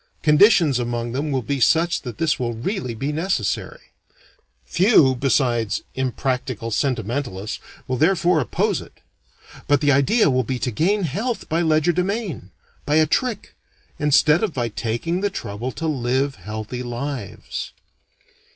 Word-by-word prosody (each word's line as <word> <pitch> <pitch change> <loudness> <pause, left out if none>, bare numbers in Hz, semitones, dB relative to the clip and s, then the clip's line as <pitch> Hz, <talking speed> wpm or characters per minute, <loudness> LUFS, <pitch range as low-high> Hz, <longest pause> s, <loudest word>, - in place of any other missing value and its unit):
Conditions 150 - +5
among 120 -1 -2
them 145 +4 -2
will 130 -2 -1
be 140 +5 -2
such 165 +7 +3
that 120 -4 -7
this 160 -2 +1
will 120 -2 -1
really 125 - -3
be 135 +6 -2
necessary. 160 - -2 0.7
Few 165 - +4
besides 120 -4 0
impractical 130 -3 -2
sentimentalists 115 -4 -2 0.3
will 130 - -1
therefore 170 +2 +3
oppose 130 - 0
it. - - -15 0.7
But 145 -1 +4
the 145 0 +3
idea 140 - +3
will 130 0 +2
be 130 +3 -3
to 125 0 -2
gain 190 - +1
health 200 - -2
by 165 +2 0
legerdemain, 175 - 0 0.3
by 150 - 0
a 155 0 +5
trick, 225 - -1 0.5
instead 150 +2 +4
of 205 -7 -1
by 120 -2 -1
taking 120 - -2
the 205 - +1
trouble 120 - -5
to 165 - -5
live 135 -1 0
healthy 110 +2 -6
lives. 125 -2 -5
140 Hz, 140 wpm, -22 LUFS, 120-165 Hz, 0.7 s, Conditions